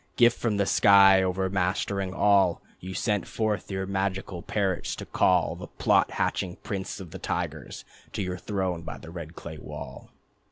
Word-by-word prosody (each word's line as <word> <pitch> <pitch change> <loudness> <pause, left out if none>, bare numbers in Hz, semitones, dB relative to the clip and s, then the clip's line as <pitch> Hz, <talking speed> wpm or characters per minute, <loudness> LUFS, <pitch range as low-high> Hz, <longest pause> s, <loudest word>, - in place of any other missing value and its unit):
Gift 120 -1 +4
from 110 -4 0
the 100 - +2
sky, 100 -1 +6
overmastering 95 +1 -1
all, 95 -3 +3 0.2
You 95 +1 -7
sent 105 -4 0
forth 110 -2 -2
your 95 -1 -2
magical 95 -2 -2
parrots 95 -2 -1
to - - -7
call 90 -3 +2
The 90 - -8
plot - - +2
hatching 90 -1 -1
prince 95 -1 -4
of 90 -4 -9
the - - -8
tigers, - - -4 0.3
To 100 - -2
your 90 -1 -4
throne 95 -3 -2
by 80 -2 -7
the 80 - -11
red 85 -1 -8
clay 80 -2 -8
wall. - - -9
95 Hz, 165 wpm, -27 LUFS, 90-100 Hz, 0.3 s, sky